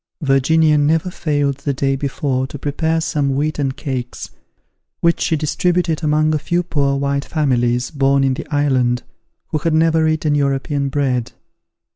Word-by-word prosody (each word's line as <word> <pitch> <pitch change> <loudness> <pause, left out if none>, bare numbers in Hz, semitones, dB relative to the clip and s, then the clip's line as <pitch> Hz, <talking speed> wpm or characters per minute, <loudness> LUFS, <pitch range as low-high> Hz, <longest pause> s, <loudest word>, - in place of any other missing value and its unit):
Virginia 150 +3 +3
never 160 +4 +1
failed 145 -5 -1
the 140 0 -3
day 135 +1 0
before 135 -1 -2
to 145 - -8
prepare 160 +3 -1
some 140 -4 -1
wheaten 145 -1 -1
cakes, 130 -3 -5 0.7
which 170 0 +2
she 165 - +1
distributed 165 +2 0
among 155 +1 +2
a 155 - +1
few 175 +4 -1
poor 140 -5 0
white 140 0 -1
families, 125 -5 0
born 140 -2 +2
in 135 -1 +2
the 150 - -6
island, 130 -5 +1 0.5
who 155 - -1
had 165 +1 0
never 160 0 +3
eaten 155 -1 +1
European 140 0 0
bread. 130 -4 -1
145 Hz, 150 wpm, -18 LUFS, 135-155 Hz, 0.7 s, Virginia